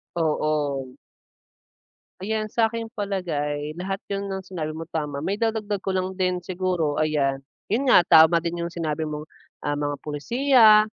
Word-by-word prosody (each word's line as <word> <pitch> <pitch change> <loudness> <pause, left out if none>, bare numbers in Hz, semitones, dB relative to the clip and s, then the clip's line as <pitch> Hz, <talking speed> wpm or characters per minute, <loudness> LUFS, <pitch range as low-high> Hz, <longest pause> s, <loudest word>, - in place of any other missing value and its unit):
Oo. 150 -5 -1 1.2
Ayan 215 +2 -2
sa 230 +1 +3
aking 225 0 -5
palagay 155 -6 -2
lahat 195 +2 -3
yun 200 0 -2
ng 190 -1 -4
sinabi 165 -5 -5
mo 160 - -6
tama. 150 -3 -3
Maidadagdag 210 +2 -1
ko 190 0 -3
lang 185 0 -2
din 180 -1 0
siguro 180 -4 -1
ayan, 145 -3 +1 0.3
yun 245 +7 +1
nga 215 -8 +7
tama 160 0 +6
din 170 0 -3
yung 170 - -8
sinabi 160 -2 -2
mong, 150 0 -4 0.4
ah, 145 0 -1
mga 145 0 -1
pulisiya, 220 - +5
175 Hz, 150 wpm, -24 LUFS, 150-200 Hz, 1.2 s, nga